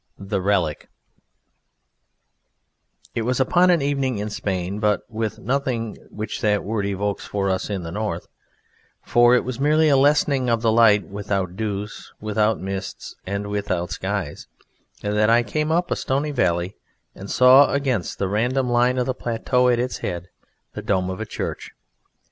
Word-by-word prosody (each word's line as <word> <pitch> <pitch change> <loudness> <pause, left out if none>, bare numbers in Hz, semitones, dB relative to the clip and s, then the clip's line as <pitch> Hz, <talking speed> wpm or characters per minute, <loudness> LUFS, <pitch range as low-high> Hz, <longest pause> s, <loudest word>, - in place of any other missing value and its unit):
THE 100 0 -3
RELIC 90 -6 0 2.2
It - - -1
was 125 +3 0
upon 175 +7 +4
an 170 -5 +3
evening 135 -4 0
in 105 +1 -4
Spain, 95 -1 -3
but 105 -2 +2
with 110 -2 -3
nothing 125 -2 -2
which 110 +1 -5
that 105 -1 +2
word 105 -1 -2
evokes 100 +1 -2
for 100 -1 -1
us 95 - -2
in 100 -3 -3
the 80 - -6
North 100 -3 -3 0.8
for 120 +1 +5
it 125 - +2
was 130 -1 -5
merely 155 +2 +3
a 140 - +5
lessening 140 -2 +3
of 115 0 +1
the 115 - +4
light 105 -5 +5
without 100 -3 -3
dews, 105 0 -5
without 110 +1 +1
mists, 95 0 -6
and 100 +1 -2
without 90 -4 -2
skies 95 -3 -4 0.6
that 105 +1 +2
I 120 +1 +5
came 155 +5 -1
up 175 +2 +1
a - - +2
stony 140 +3 -1
valley 90 -7 0 0.4
and 100 +1 -10
saw 130 +3 +6
against 130 -9 -1
the 100 - -1
random 120 +5 0
line 125 +1 +3
of 125 - +1
the 130 - -1
plateau 125 +1 +1
at 120 - +3
its 125 +1 -2
head 90 0 -4 0.4
the - - -5
dome 95 -2 0
of 95 - -6
a 110 - -4
church. - - -5
110 Hz, 165 wpm, -22 LUFS, 100-125 Hz, 2.2 s, saw